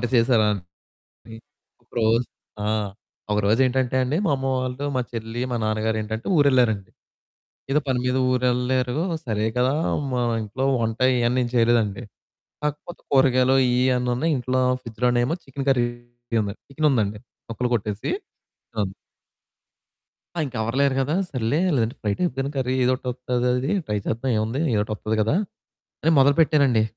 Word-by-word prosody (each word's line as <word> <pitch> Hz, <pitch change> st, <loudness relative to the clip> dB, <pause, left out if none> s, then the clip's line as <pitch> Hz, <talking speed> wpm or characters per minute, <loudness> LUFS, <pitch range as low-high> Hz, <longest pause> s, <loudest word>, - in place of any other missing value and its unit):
వంట -, -, -2 dB
చేసారా 115 Hz, -2 st, +4 dB
అని 100 Hz, -3 st, -4 dB, 1.2 s
ఒకరోజు 115 Hz, +1 st, +1 dB, 0.4 s
ఆ! -, -, 0 dB, 0.6 s
ఒకరోజేంటంటే 125 Hz, +5 st, +2 dB
అండి 140 Hz, +6 st, 0 dB
మా 160 Hz, -, +2 dB
అమ్మ 135 Hz, 0 st, -3 dB
వాళ్ళు, 130 Hz, +2 st, -3 dB
మా 125 Hz, -, +2 dB
చెల్లి, 115 Hz, +1 st, -5 dB
మా 120 Hz, -, 0 dB
నాన్నగారేంటంటే 110 Hz, +1 st, -2 dB
ఊరెళ్లారండి. 125 Hz, -9 st, +3 dB, 0.8 s
ఏదో 150 Hz, +2 st, +3 dB
పని 130 Hz, -2 st, +1 dB
మీద 125 Hz, 0 st, +1 dB, 0.2 s
ఊరు 125 Hz, 0 st, +1 dB
ఎళ్ళారు 125 Hz, +1 st, 0 dB, 0.3 s
సరే 110 Hz, -1 st, 0 dB
కదా, 130 Hz, +3 st, +2 dB, 0.4 s
మా 125 Hz, -, 0 dB, 0.2 s
ఇంట్లో 115 Hz, +6 st, -3 dB, 0.2 s
వంట 115 Hz, +1 st, -2 dB, 0.2 s
ఇయన్నీ 120 Hz, +1 st, +2 dB
ఏం 120 Hz, -, -3 dB
చేయలేదండి. 115 Hz, -2 st, +2 dB, 0.6 s
కాకపోతే 150 Hz, +4 st, -4 dB
కూరగాయలు 130 Hz, -1 st, +4 dB
ఇయన్నీ 125 Hz, 0 st, +2 dB
ఉన్నాయి. 160 Hz, +6 st, +1 dB
ఇంట్లో 130 Hz, +1 st, 0 dB, 0.2 s
ఫ్రిడ్జులోనేమో 120 Hz, +5 st, 0 dB
చికెన్ 135 Hz, 0 st, -6 dB
కర్రీ 120 Hz, -2 st, +3 dB, 0.8 s
చికెనుందండి 130 Hz, -8 st, +1 dB, 0.3 s
ముక్కలు 125 Hz, +2 st, -2 dB
కొట్టేసి. 105 Hz, -1 st, -3 dB, 0.7 s
అవును. 100 Hz, -2 st, 0 dB, 1.4 s
ఆ! -, -, -2 dB
ఇంక 130 Hz, -, -10 dB
ఎవరు 115 Hz, +3 st, -2 dB
లేరు 140 Hz, -1 st, +3 dB
గదా 145 Hz, +4 st, 0 dB, 0.2 s
సర్లే 130 Hz, +2 st, 0 dB, 0.2 s
లేదంటే 115 Hz, 0 st, 0 dB
ఫ్రై 105 Hz, -2 st, 0 dB
టైప్‌గాని 135 Hz, -6 st, -1 dB
కర్రీ 130 Hz, -1 st, 0 dB
ఏదోకటి 130 Hz, 0 st, 0 dB
వస్తదది 125 Hz, +2 st, -1 dB, 0.2 s
ట్రై 105 Hz, -, -1 dB
చేద్దాం 120 Hz, +4 st, -1 dB
ఏముంది 110 Hz, +6 st, -1 dB
ఏదో 105 Hz, -, +2 dB
ఒకటి 110 Hz, +1 st, -5 dB
వత్తది 110 Hz, +1 st, -2 dB
గదా 110 Hz, +8 st, +2 dB, 0.7 s
అని 160 Hz, -, +3 dB
మొదలు 140 Hz, +1 st, +5 dB
పెట్టానండి. 140 Hz, -8 st, +4 dB
125 Hz, 140 wpm, -23 LUFS, 110-130 Hz, 1.4 s, మొదలు